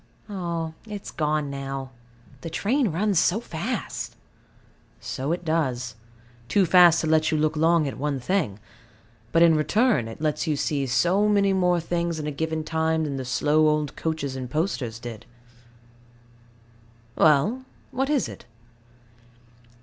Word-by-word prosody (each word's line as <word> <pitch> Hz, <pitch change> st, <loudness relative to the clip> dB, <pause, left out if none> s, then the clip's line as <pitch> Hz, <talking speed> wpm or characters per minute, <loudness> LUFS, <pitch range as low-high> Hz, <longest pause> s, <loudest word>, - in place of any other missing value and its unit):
Ah, 170 Hz, -5 st, -3 dB, 0.2 s
it 210 Hz, -1 st, -5 dB
is -, -, -8 dB
gone 150 Hz, -2 st, -1 dB
now. 135 Hz, -1 st, -5 dB, 0.5 s
The 165 Hz, -, -5 dB
train 230 Hz, -, +1 dB
runs 195 Hz, +2 st, +1 dB
so 180 Hz, +4 st, +2 dB
fast. 220 Hz, +2 st, -4 dB, 0.8 s
So 135 Hz, +4 st, -4 dB
it 175 Hz, 0 st, -3 dB
does; 130 Hz, -7 st, -1 dB, 0.6 s
too 200 Hz, -2 st, +3 dB
fast 175 Hz, -1 st, +6 dB
to 160 Hz, -, -2 dB
let 155 Hz, 0 st, +3 dB
you 155 Hz, -, +1 dB
look 155 Hz, +1 st, +1 dB
long 160 Hz, 0 st, +3 dB
at 135 Hz, -, -6 dB
one 140 Hz, -1 st, -1 dB
thing: 140 Hz, -, -1 dB, 0.7 s
but 165 Hz, -, +5 dB
in 165 Hz, -1 st, +6 dB
return, 155 Hz, -, +2 dB
it 115 Hz, -, -9 dB
lets 155 Hz, +1 st, -1 dB
you 155 Hz, -, +1 dB
see 140 Hz, -1 st, -1 dB
so 180 Hz, +11 st, +2 dB
many 200 Hz, -1 st, +3 dB
more 180 Hz, -2 st, +2 dB
things 170 Hz, 0 st, -2 dB
in 150 Hz, -, -4 dB
a 150 Hz, -, -2 dB
given 160 Hz, +2 st, -2 dB
time 160 Hz, 0 st, 0 dB
than 140 Hz, -3 st, -3 dB
the 130 Hz, -, -4 dB
slow 150 Hz, +5 st, +2 dB
old 150 Hz, -1 st, 0 dB
coaches 155 Hz, -4 st, -3 dB
and 130 Hz, -2 st, -5 dB
posters 135 Hz, -, -2 dB
did. 115 Hz, -2 st, -8 dB, 1.9 s
Well? 160 Hz, -, +3 dB, 0.3 s
what 270 Hz, +2 st, -1 dB
is 295 Hz, -4 st, +1 dB
it? -, -, -11 dB
160 Hz, 150 wpm, -25 LUFS, 145-175 Hz, 1.9 s, fast